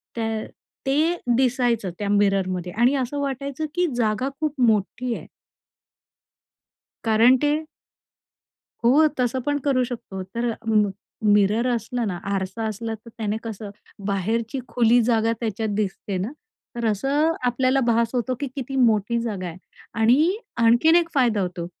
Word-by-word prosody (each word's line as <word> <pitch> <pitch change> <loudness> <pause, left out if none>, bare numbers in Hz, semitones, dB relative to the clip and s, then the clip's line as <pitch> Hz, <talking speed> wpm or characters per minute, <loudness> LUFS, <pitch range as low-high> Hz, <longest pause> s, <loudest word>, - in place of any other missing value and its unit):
त्या 225 -1 -1 0.6
ते 305 +6 +2 0.2
दिसायचं 245 -5 +1
त्या 200 -1 -2
मिररमध्ये 190 -3 +1
आणि 240 +5 +3
असं 270 +2 -2
वाटायचं, 280 +2 -3
की 355 -1 +2
जागा 235 +2 0
खूप 300 -4 -2
मोठी 235 +2 +1
आहे. - - -9 1.8
कारण 225 +3 +5
ते 300 +2 +1 1.2
हो. 285 +7 +6
तसं 250 +1 +1
पण 290 0 +1
करू 255 -2 +3
शकतो. 225 -6 -6
तर 230 +5 -2
म 210 -2 +3 0.3
मिरर 210 +3 +3
असलं 235 0 -1
ना, 185 - -2 0.2
आरसा 190 +3 -3
असला, 225 +1 -4
तर 220 +2 -15
त्याने 215 -1 -1
कसं 220 -2 -6 0.4
बाहेरची 225 +6 -1
खुली 240 0 +4
जागा 225 -1 +2
त्याच्यात 220 -1 -2
दिसते 200 -1 -2
ना, 195 +7 -3 0.4
तर 235 -1 -2
असं 275 +9 +1
आपल्याला 255 +2 +2
भास 230 0 +3
होतो, 250 +1 -1
की 285 - -2
किती 270 -1 -5
मोठी 235 -2 +2
जागा 200 -6 -3
आहे. 170 - -8 0.4
आणि 290 - +4 0.3
आणखीन 240 +8 +5
एक 340 -1 +3
फायदा 240 -7 +2
होतो, 180 -2 -3
235 Hz, 140 wpm, -23 LUFS, 210-260 Hz, 1.8 s, हो